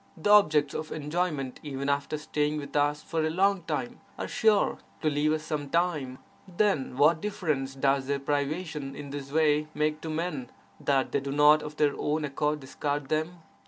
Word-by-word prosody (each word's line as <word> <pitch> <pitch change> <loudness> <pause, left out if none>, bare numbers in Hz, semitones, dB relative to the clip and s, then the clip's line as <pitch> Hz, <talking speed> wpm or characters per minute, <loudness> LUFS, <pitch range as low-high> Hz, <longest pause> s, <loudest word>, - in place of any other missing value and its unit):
The 185 +6 +1
objects 155 -8 +5
of 155 - -5
enjoyment, 150 -3 -2
even 140 -2 -4
after 140 +1 0
staying 150 0 -1
with 145 -1 -7
us 145 0 +1
for 165 -2 -1
a 155 - +1
long 195 +3 +2
time, 135 -6 -3 0.2
are - - -3
sure 215 -2 +2 0.2
to 155 - +2
leave 145 +1 +2
us 155 0 -1
sometime; 150 -2 -1 0.3
then 180 -9 0
what 155 +3 +4
difference 155 -10 -2
does 135 0 +1
their 140 0 +1
privation 145 +1 -2
in 145 -1 -8
this 140 -1 -6
way 150 -1 +3
make 150 +1 0
to 160 - -5
men, 175 - -3 0.3
that 135 -2 +1
they - - +1
do 140 0 -5
not 150 +2 +6
of 150 0 -7
their 145 -2 +3
own 150 +1 0
accord 150 +1 -1
discard 145 +1 -3
them? 160 +2 -2
150 Hz, 180 wpm, -28 LUFS, 140-160 Hz, 0.3 s, not